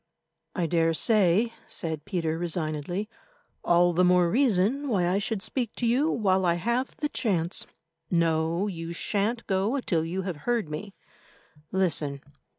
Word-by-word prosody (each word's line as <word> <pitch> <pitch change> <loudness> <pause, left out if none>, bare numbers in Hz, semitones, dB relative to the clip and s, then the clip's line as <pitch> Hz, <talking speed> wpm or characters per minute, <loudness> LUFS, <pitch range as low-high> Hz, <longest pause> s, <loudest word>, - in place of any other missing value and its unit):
"I 180 - 0
daresay," 175 +6 +2 0.2
said 160 -3 -4
Peter 165 -4 -1
resignedly; 170 +3 -2 0.6
"all 175 0 +4
the 180 +2 +3
more 180 -1 +4
reason 255 +3 +2
why 185 -7 +2
I 185 +3 +2
should 205 -1 -2
speak 230 +1 -3
to 245 - -2
you 255 +7 +3
while 190 -8 +2
I 170 -2 +3
have 235 +9 -1
the 295 - -1
chance. 180 - -1 0.4
No, 165 +1 +1
you 170 -4 -5
shan't 215 +6 -1
go 200 +7 0
till 170 -10 0
you 180 +4 -3
have 180 -4 -4
heard 230 0 -1
me. 195 +7 -6 0.8
Listen. 155 -7 0
185 Hz, 145 wpm, -27 LUFS, 170-220 Hz, 0.8 s, all